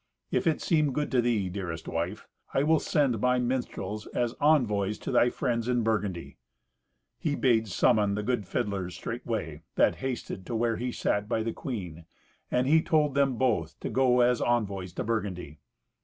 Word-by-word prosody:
If - - +1
it 160 - +1
seem 155 -5 +2
good 150 +2 -2
to 125 -2 +3
thee, 115 -5 +1
dearest 90 -4 -5
wife, 85 +6 -3 0.3
I 135 - +3
will 160 +1 +4
send 135 -8 +1
my 125 0 +3
minstrels 120 -5 -2
as 120 -1 0
envoys 105 -9 +3
to - - -5
thy 120 - +4
friends 115 -1 -1
in 120 -2 +1
Burgundy." 105 -6 -2 0.8
He 145 -3 0
bade 115 -5 +2
summon 105 +1 +2
the 105 - -2
good 110 -4 -1
fiddlers 100 -6 -2
straightway, - - -4
that - - +3
hasted 130 -7 -4
to 120 - -3
where 115 0 +1
he 125 +1 -2
sat 105 -2 -1
by 110 -2 0
the 115 - -2
queen, 90 - -6 0.4
and 125 +1 +1
he 160 +4 +5
told 150 -3 +2
them 140 -2 +2
both 110 -11 0
to - - -3
go 125 -1 +4
as 125 0 +3
envoys 100 -6 0
to - - -3
Burgundy. 95 -9 -3
115 Hz, 175 wpm, -28 LUFS, 100-130 Hz, 0.8 s, he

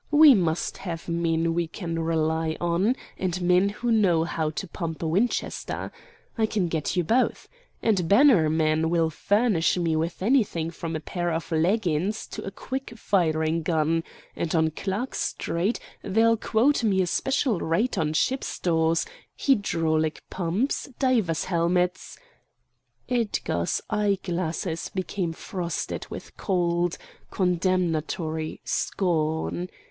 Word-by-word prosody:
We 300 -1 +8
must 170 -6 0
have 170 -4 -6
men 165 -1 +1
we 170 0 0
can 165 -1 -4
rely 160 0 0
on, 175 +8 +1 0.2
and 185 -1 -1
men 180 +2 +3
who 235 +4 -2
know 185 -7 +4
how 160 -2 -1
to 160 +5 -5
pump 165 -1 -5
a - - 0
Winchester. 200 +10 -1 0.5
I 220 - +3
can 195 -5 0
get 160 +1 -1
you 180 - +2
both. 240 +10 +1 0.4
And 190 -7 +2
Bannerman 160 - +4
will 165 -1 +2
furnish 200 -1 +2
me 165 -2 +1
with 165 +3 -2
anything 200 -9 +2
from 165 0 -5
a - - -1
pair 175 +2 -2
of 165 +1 -3
leggins 180 +3 +1
to - - -6
a - - -4
quick 260 +5 -6
firing 160 -5 +1
gun, 160 0 +1 0.3
and 170 0 -2
on 160 -1 +3
Clark 200 - -3
Street 180 +8 -1 0.2
they'll 225 +3 +3
quote 235 +5 +2
me 195 -4 +3
a - - 0
special 255 +2 0
rate 175 +10 0
on 155 -5 0
ship 260 +11 +1
stores, 165 -1 +1 0.3
hydraulic 165 - +1
pumps, 190 +12 -1
divers' 230 - +1
helmets——" 180 +1 0 0.9
Edgar's 225 - -1
eye 210 -2 +2
glasses 170 -1 -2
became 185 -1 -2
frosted 170 0 -4
with - - -9
cold, 175 -2 0 0.3
condemnatory 170 -3 -1
scorn. 165 0 -1
175 Hz, 130 wpm, -26 LUFS, 160-205 Hz, 0.9 s, We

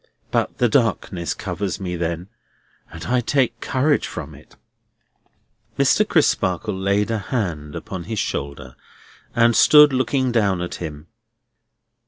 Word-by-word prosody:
But - - -1
the 125 - +3
darkness 110 -7 0
covers 95 -4 -4
me 90 -2 -4
then, 85 +1 -3 0.6
and 80 +1 -8
I 125 0 +1
take 120 -2 0
courage 140 +3 +1
from - - -7
it." - - -17 1.2
Mr. - - +3
Crisparkle 95 +3 +1
laid 100 +3 0
a 110 - 0
hand 90 - -3
upon 90 -3 -6
his 110 +1 -4
shoulder, 70 -7 -4 0.6
and 115 -1 +4
stood 150 -2 +7
looking 130 0 +1
down 100 -6 +1
at 90 0 -4
him. 75 -2 -6
100 Hz, 130 wpm, -21 LUFS, 85-120 Hz, 1.2 s, stood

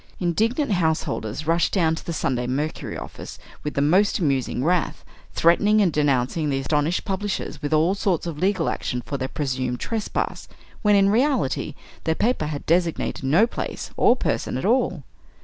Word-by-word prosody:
Indignant 220 - +1
house 160 -4 +2
holders 110 +8 -4
rushed 165 +2 +1
down 165 -5 +3
to 160 - -6
the - - -4
"Sunday 125 -6 -1
Mercury" 145 +5 -3
office - - -8 0.3
with 150 - -4
the 140 - +2
most 190 +8 +3
amusing 135 - 0
wrath, 175 +2 0 0.3
threatening 205 +6 +4
and 185 -6 +3
denouncing 145 +1 +1
the 135 - 0
astonished 150 +5 0
publishers 195 -6 -3
with 145 - -3
all 160 +4 +3
sorts 195 -4 0
of 165 -3 -5
legal 190 -1 +1
action 125 -1 -2
for 140 - -3
their 130 -1 -2
presumed 130 -4 -2
trespass, 225 -3 -3 0.3
when 210 -1 +4
in 195 0 +5
reality, 260 +6 +1 0.3
their 160 - +1
paper 220 -8 0
had 150 -2 -5
designated 170 -3 0
no 160 +11 +4
place 235 - -5
or 240 - +5
person 245 - -1
at 130 - -3
all. 215 - +1
165 Hz, 170 wpm, -23 LUFS, 145-195 Hz, 0.3 s, in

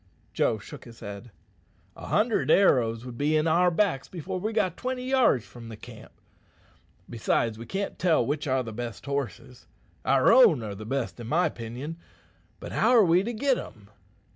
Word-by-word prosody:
Joe 110 - +1
shook 105 - -11
his 115 -2 -14
head. 100 +4 -8 0.7
"A - - -10
hundred 220 +2 +1
arrows 120 - +3
would 120 -2 -9
be 150 +2 +2
in 155 - +1
our 170 +3 +4
backs 170 -6 0
before 185 +2 -5
we 215 +4 -2
got 185 -6 0
twenty 255 0 -4
yards 255 - +3
from 115 -2 -12
the 110 - -9
camp. - - -13 1.0
Besides, 115 -1 -1
we 115 - -9
can't 195 +1 -4
tell 165 -9 +2
which 145 +3 -2
are 130 -1 +1
the 115 -2 -7
best 115 -2 -6
horses. 130 -3 -5 0.4
Our 135 - +4
own 220 - +6
are 105 -2 -5
the 105 +2 -9
best 125 -4 -3
in 115 - -7
my 165 +8 +2
'pinion, 125 +8 -7 0.6
but - - -8
how - - +2
are 235 -5 +6
we 175 +1 +4
to 225 +5 -3
git' 260 +3 +1
em?" 105 -1 -11
140 Hz, 185 wpm, -26 LUFS, 115-185 Hz, 1.0 s, own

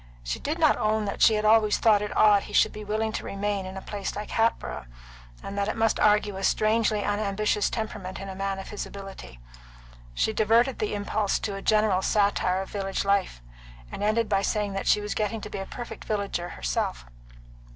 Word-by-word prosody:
She - - -3
did 305 +3 -2
not 315 -3 +4
own 215 0 +1
that 200 - -4
she 220 - +6
had 210 0 -1
always 215 -1 +4
thought 215 -3 +4
it 210 - -4
odd 205 -2 +6
he 210 - -11
should - - +4
be 215 - -7
willing 215 +1 -1
to - - -4
remain 200 -1 -2
in 190 +1 -7
a 190 - -7
place 200 -2 -5
like 210 - -6
Hatboro', 225 - -1 0.6
and 195 - -6
that 200 0 0
it 215 - -2
must 225 -1 +1
argue 210 -1 +3
a 195 - -5
strangely 215 0 +2
unambitious 205 0 0
temperament 210 -4 -5
in 195 - -7
a 190 - -6
man 195 0 -3
of 195 - -8
his 210 - -5
ability. 195 - -10 0.8
She 220 - +1
diverted 230 +4 +3
the 210 -1 -1
impulse 205 0 0
to 205 - -3
a 195 - -6
general 210 -3 +2
satire 195 -2 +1
of - - -12
village 195 -1 -2
life, 195 - 0 0.5
and - - -6
ended 215 +2 +1
by 195 - +1
saying 205 0 -1
that 195 - -4
she 210 - +4
was 210 0 -3
getting 215 +1 -1
to - - -8
be - - -4
a 195 - -5
perfect 240 -1 -8
villager 200 -4 -2
herself. - - -3
205 Hz, 210 wpm, -26 LUFS, 195-215 Hz, 0.8 s, she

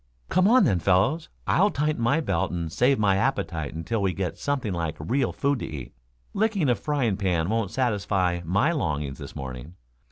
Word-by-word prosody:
"Come 185 +2 +3
on 250 +4 +6
then, 95 - +2
fellows. 100 - +2 0.2
I'll 200 +4 +3
tighten 150 -6 -1
my 135 +8 +2
belt 95 - -1
and 85 -2 -3
save 130 +9 +3
my 100 -2 +3
appetite 85 - -1
until 90 +7 -2
we 95 -2 +1
get 90 0 -3
something 135 -8 -2
like 85 -2 -2
real 120 - 0
food 140 -1 0
to - - -4
eat. 70 -6 -7 0.4
Licking 205 - +1
a - - +5
frying 130 -10 -1
pan 90 -4 0
won't 110 -3 0
satisfy 100 -7 0
my 100 - +2
longings 75 - -2
this - - -9
morning. 65 +5 -7
100 Hz, 185 wpm, -25 LUFS, 85-140 Hz, 0.4 s, on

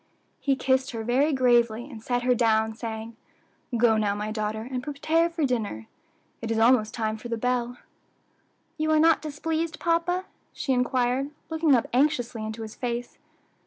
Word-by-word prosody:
He 275 -2 +1
kissed 260 0 +1
her 225 -1 -4
very 260 +7 +2
gravely, 240 -3 +2
and 235 -6 -10
set 245 +1 -1
her 250 0 +4
down, 220 -2 +2
saying, 225 0 -6 0.6
"Go 225 -1 +4
now, 205 -2 +1
my 210 +1 -3
daughter, 215 0 -2
and 255 -1 -2
prepare 310 +4 +1
for 335 -3 -1
dinner; 215 - -2 0.6
it 225 - -4
is 225 - 0
almost 225 -1 +4
time 220 -1 -1
for 220 - -8
the 230 -1 -2
bell." 245 +1 -1 1.0
"You 310 0 0
are 310 0 +4
not 325 +1 +5
displeased, 320 +2 -3
papa?" 345 +2 +1 0.3
she 270 - -1
inquired, 250 +2 +1 0.2
looking 320 -3 +3
up 235 - +1
anxiously 245 -4 +1
into 220 +1 -5
his 215 -1 -8
face. 240 -1 -4
245 Hz, 165 wpm, -26 LUFS, 225-285 Hz, 1.0 s, not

